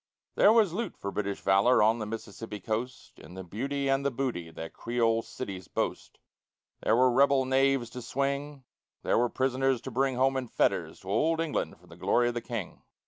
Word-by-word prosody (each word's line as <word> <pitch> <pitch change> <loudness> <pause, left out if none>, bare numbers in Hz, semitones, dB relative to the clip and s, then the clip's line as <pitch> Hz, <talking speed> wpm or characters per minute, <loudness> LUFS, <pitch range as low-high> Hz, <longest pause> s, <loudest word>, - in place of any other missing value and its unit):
There 205 - +6
was 215 -6 +4
loot 220 0 -3
for 100 - -5
British 100 -1 -3
valor 100 +5 +4
on 110 +2 +3
the 105 - -4
Mississippi 110 -1 -7
coast 115 +6 -5
In 90 - -12
the 95 - -6
beauty 135 +10 -3
and 135 0 +2
the 140 - +2
booty 120 -11 -3
that - - -18 0.2
the - - -31
Creole 115 -1 +1
cities 95 -8 -7
boast; - - -3 0.6
There 110 - +3
were 130 +1 +4
rebel 135 +1 +4
knaves 135 -2 +2
to 125 - -7
swing, 140 +3 -2 0.4
there - - +2
were 120 0 +2
prisoners 130 0 +1
to 130 - -7
bring 135 +2 +1
Home 135 +1 +2
in 130 -1 -3
fetters - - 0
to - - -10
old 165 +1 +2
England 165 -2 -2
for - - -21
the 85 - -14
glory 100 +7 +2
of - - -3
the 120 - -3
King! 115 -6 -6
125 Hz, 200 wpm, -29 LUFS, 110-135 Hz, 0.6 s, There